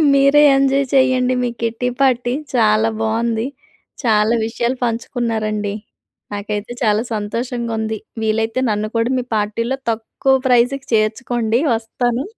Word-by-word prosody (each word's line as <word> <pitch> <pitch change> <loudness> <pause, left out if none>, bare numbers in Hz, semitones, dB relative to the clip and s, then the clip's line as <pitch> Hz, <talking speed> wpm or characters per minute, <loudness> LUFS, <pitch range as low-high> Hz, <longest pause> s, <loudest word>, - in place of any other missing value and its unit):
మీరే 275 +2 +5
ఎంజాయ్ 275 0 +2
చేయండి, 255 -1 +3
మీ 245 - +1
kitty 230 +2 -1
party. 245 -2 +2 0.2
చాలా 220 -2 +3
బావుంది. 225 +1 0 0.6
చాలా 220 -1 +3
విషయాలు 235 +2 -1
పంచుకున్నారండి. 225 -3 -2 0.6
నాకైతే 205 +3 -4
చాలా 215 -1 +3
సంతోషంగా 230 +2 -3
ఉంది. 220 0 -2 0.3
వీలైతే 225 +3 0
నన్ను 210 0 -1
కూడా 230 +2 +1
మీ 250 - -1
పార్టీలో 230 +5 -1
తక్కువ 230 +4 0
ప్రైజ్‌కి 250 +3 +2
చేర్చుకోండి 225 +1 +1 0.2
వస్తాను. 240 +3 -2
230 Hz, 115 wpm, -19 LUFS, 220-250 Hz, 0.6 s, మీరే